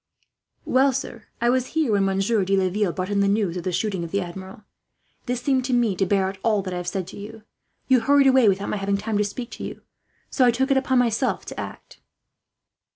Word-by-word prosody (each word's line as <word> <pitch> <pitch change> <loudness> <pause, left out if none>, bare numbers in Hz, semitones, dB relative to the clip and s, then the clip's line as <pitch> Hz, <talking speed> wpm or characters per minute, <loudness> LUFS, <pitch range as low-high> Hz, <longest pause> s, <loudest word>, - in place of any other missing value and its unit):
"Well, 265 +1 +3
sir, 235 -3 -5 0.2
I 240 0 +3
was 255 0 0
here 305 -8 +2
when 200 -2 +2
Monsieur 195 +2 +1
de 195 +1 +1
Laville 190 +1 +1
brought 185 +3 -4
in 200 - +1
the 200 - +3
news 200 -4 +1
of 180 - -4
the 185 - -2
shooting 190 -1 -1
of 170 - -6
the 200 - -1
Admiral. 190 +2 -8 0.6
This 245 0 -2
seemed, 265 -3 +2
to 255 - -1
me, 235 -5 +2
to 195 +1 0
bear 195 0 +2
out 190 0 -6
all 210 -2 +1
that 185 -1 -5
I - - -3
have 175 0 -5
said 185 0 -2
to - - -10
you. 215 +2 -10 0.4
You 260 -1 +5
hurried 280 +4 +4
away 260 -4 +5
without 195 +1 -1
my - - -1
having 200 0 0
time 215 0 -2
to - - +3
speak 235 +4 -6
to - - -8
you, - - -7 0.5
so 265 - +2
I 245 - +6
took 265 +4 0
it 270 - +4
upon 265 -1 +1
myself 245 +1 +1
to - - -7
act." - - -9
210 Hz, 240 wpm, -23 LUFS, 195-245 Hz, 0.6 s, I